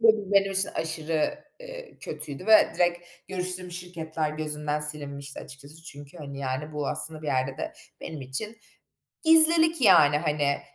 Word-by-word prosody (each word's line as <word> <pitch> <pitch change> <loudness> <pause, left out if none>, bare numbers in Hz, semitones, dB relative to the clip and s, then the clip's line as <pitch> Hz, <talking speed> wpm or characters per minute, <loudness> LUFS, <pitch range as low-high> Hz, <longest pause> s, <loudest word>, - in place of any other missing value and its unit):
Bu 220 -3 +3
benim 195 0 +3
için 195 +1 +1
aşırı, 160 - -2 0.2
eee, - - -11
kötüydü 145 +5 -7
ve 220 -1 +6
direkt 175 0 0 0.2
görüştüğüm 185 -1 -4
şirketler 165 -3 -4
gözünden 150 -1 -3
silinmişti 145 -2 -3
açıkçası 140 +4 -13
çünkü 145 +1 -12
hani, 140 -2 -8
yani, 140 +3 -4
bu 150 -2 -3
aslında 155 -1 -3
bir - - -7
yerde 130 -1 -1
de - - -4 0.3
benim 155 -3 -7
için 135 - -5 0.7
gizlilik 320 0 +6
yani, 155 - +6
hani, 150 -2 0
160 Hz, 145 wpm, -26 LUFS, 145-195 Hz, 0.7 s, ve